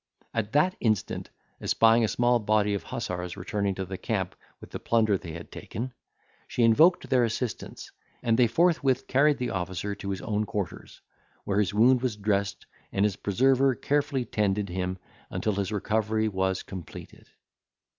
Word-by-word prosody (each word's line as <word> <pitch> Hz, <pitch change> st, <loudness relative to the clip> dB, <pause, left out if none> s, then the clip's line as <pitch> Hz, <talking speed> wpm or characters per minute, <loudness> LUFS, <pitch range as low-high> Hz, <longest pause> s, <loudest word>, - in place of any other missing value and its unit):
At 110 Hz, -1 st, -2 dB
that 180 Hz, +6 st, +3 dB
instant, 110 Hz, -4 st, -1 dB, 0.3 s
espying 115 Hz, +1 st, +4 dB
a -, -, +3 dB
small 120 Hz, +2 st, +2 dB
body 105 Hz, -1 st, +2 dB
of 100 Hz, -, -1 dB
hussars 90 Hz, +2 st, -5 dB
returning 100 Hz, +1 st, -2 dB
to 95 Hz, -, -3 dB
the 95 Hz, 0 st, -6 dB
camp -, -, -2 dB, 0.2 s
with -, -, -13 dB
the -, -, -5 dB
plunder 110 Hz, -3 st, +2 dB
they 85 Hz, -4 st, -6 dB
had 85 Hz, +1 st, -9 dB
taken, 125 Hz, +3 st, -6 dB, 0.5 s
she 120 Hz, -, 0 dB
invoked 155 Hz, +11 st, +5 dB
their 125 Hz, -2 st, +3 dB
assistance, 115 Hz, 0 st, -4 dB, 0.3 s
and 115 Hz, -1 st, +3 dB
they 120 Hz, 0 st, +5 dB
forthwith 140 Hz, -2 st, +2 dB
carried 145 Hz, +2 st, +3 dB
the 125 Hz, -, -2 dB
officer 90 Hz, +2 st, -3 dB
to 100 Hz, 0 st, -6 dB
his 95 Hz, -2 st, -3 dB
own 105 Hz, -1 st, -1 dB
quarters, 105 Hz, -6 st, -5 dB, 0.4 s
where 100 Hz, 0 st, 0 dB
his 105 Hz, -, +1 dB
wound 120 Hz, +4 st, +4 dB
was 125 Hz, -4 st, -1 dB
dressed, 100 Hz, -1 st, -1 dB, 0.3 s
and 100 Hz, +1 st, +2 dB
his 105 Hz, -3 st, 0 dB
preserver 130 Hz, +6 st, +2 dB
carefully 140 Hz, -2 st, 0 dB
tended 105 Hz, -2 st, 0 dB
him 90 Hz, +1 st, -2 dB, 0.3 s
until 110 Hz, -, -1 dB
his 100 Hz, 0 st, -2 dB
recovery 110 Hz, +1 st, 0 dB
was 95 Hz, -2 st, -1 dB
completed. 95 Hz, -4 st, -10 dB
105 Hz, 165 wpm, -27 LUFS, 100-120 Hz, 0.5 s, invoked